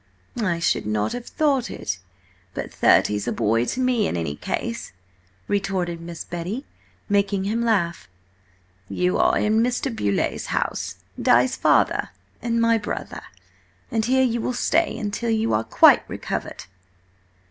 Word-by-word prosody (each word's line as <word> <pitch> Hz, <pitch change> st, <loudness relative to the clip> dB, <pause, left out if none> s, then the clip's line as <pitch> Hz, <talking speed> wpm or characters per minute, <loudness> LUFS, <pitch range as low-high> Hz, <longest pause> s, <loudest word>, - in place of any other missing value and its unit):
"I 180 Hz, -6 st, +1 dB
should 170 Hz, -10 st, 0 dB
not 105 Hz, 0 st, 0 dB
have 245 Hz, -1 st, -6 dB
thought 275 Hz, -5 st, +1 dB
it, 95 Hz, -, -4 dB, 0.6 s
but -, -, -5 dB
thirty's 105 Hz, 0 st, +3 dB
a -, -, +1 dB
boy 115 Hz, +3 st, +1 dB
to 255 Hz, -, -3 dB
me, 250 Hz, -5 st, +2 dB
in -, -, -2 dB
any 80 Hz, -4 st, -2 dB
case!" 115 Hz, +8 st, -4 dB, 0.5 s
retorted 185 Hz, -4 st, -1 dB
Miss 170 Hz, -1 st, -7 dB
Betty, 180 Hz, +10 st, -5 dB, 0.4 s
making 200 Hz, -1 st, +1 dB
him 220 Hz, +4 st, -1 dB
laugh. 175 Hz, -, 0 dB, 0.8 s
"You 180 Hz, 0 st, 0 dB
are -, -, +4 dB
in 215 Hz, +1 st, +2 dB
Mr. 245 Hz, +1 st, -1 dB
Beauleigh's 100 Hz, -, -1 dB
house–Di's -, -, 0 dB
father, -, -, +2 dB, 0.3 s
and 230 Hz, -1 st, 0 dB
my 230 Hz, 0 st, +3 dB
brother. 210 Hz, -, -5 dB, 0.7 s
And 225 Hz, -2 st, +1 dB
here 260 Hz, +2 st, +3 dB
you 235 Hz, -2 st, 0 dB
will 250 Hz, -, -1 dB
stay 330 Hz, +7 st, +1 dB
until 215 Hz, +2 st, -3 dB
you 225 Hz, 0 st, +1 dB
are 110 Hz, -, +2 dB
quite -, -, +6 dB
recovered!" -, -, -4 dB
205 Hz, 140 wpm, -23 LUFS, 170-235 Hz, 0.8 s, quite